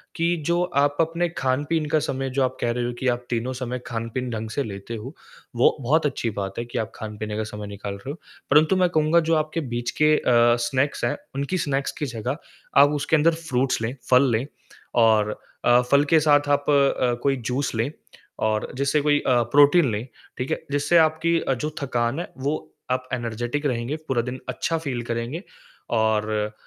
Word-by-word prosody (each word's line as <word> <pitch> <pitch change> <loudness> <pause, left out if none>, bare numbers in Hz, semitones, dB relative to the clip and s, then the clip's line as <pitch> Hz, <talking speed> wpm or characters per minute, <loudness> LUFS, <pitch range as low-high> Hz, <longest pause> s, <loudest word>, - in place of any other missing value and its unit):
कि 170 +1 +1
जो 170 +1 +2 0.2
आप 145 0 +3
अपने 165 +2 0
खान-पीन 145 +5 0
का 155 -1 +3
समय 135 -1 -2
जो 135 - +4
आप 130 - -1
कह 120 - +1
रहे 120 0 -1
हो 120 - -2
कि 130 - -1
आप 120 0 -2
तीनों 120 +2 -1
समय 125 0 -4
खान-पीन 115 +2 -3
ढंग 110 0 -4
से 140 - -1
लेते 100 +2 -6
हो, 125 +7 -7 0.4
वो 120 - +4
बहुत 150 +6 +2
अच्छी 125 -4 -1
बात 95 0 -3
है 120 - -3
कि 120 - -6
आप 110 - -3
खाने-पीने 105 -1 -5
का 110 - -1
समय 105 -1 -7
निकाल 100 0 -6
रहे 115 +8 -7
हो - - -6 0.4
परन्तु 155 +6 +5
मैं 180 -1 +3
कहूँगा 155 0 +3
जो 165 - +4
आपके 155 +2 -1
बीच 120 0 -2
के 155 0 +6
अ, - - -5 0.4
स्नैक्स 130 0 0
हैं, 120 - -1 0.2
उनकी 140 +7 -1
स्नैक्स 140 -3 -1
की 150 - -1
जगह 125 +3 -3 0.4
आप 145 - +6
उसके 150 +2 +1
अंदर 160 +2 +4
फ्रूट्स 130 -6 -1
लें 120 +4 -2
फल 130 +1 +5
लें 115 +4 0 0.6
और 105 -1 +4 0.3
अ, 120 0 +6
फल 140 +1 +6
के 160 - +7
साथ 145 -1 +3
आप 145 0 +1
अ, 140 -3 +3
कोई 140 -1 +3
जूस 125 +3 -2
ले 115 +6 0 0.6
और 110 0 -2
जैसे 140 +2 +2
कोई 145 0 +3
अ, 125 -2 +4
प्रोटीन 145 -1 +6
ले, 105 +2 -2 0.3
ठीक 125 - -3
है? - - -2
जिससे 145 +4 +3
आपकी 160 +1 +3
अ, 135 - 0
जो 150 +5 -4
थकान 120 +1 -1
है 175 - -6
वो 140 +4 -1 0.4
आप 130 0 -1
एनर्जेटिक 120 +4 -2
रहेंगे, 120 +3 -2
पूरा 120 -3 +2
दिन 125 +1 -5
अच्छा 165 - -1
फ़ील 130 -6 -3
करेंगे, 120 - -4 0.5
और 110 -1 +1
130 Hz, 200 wpm, -24 LUFS, 120-150 Hz, 0.6 s, के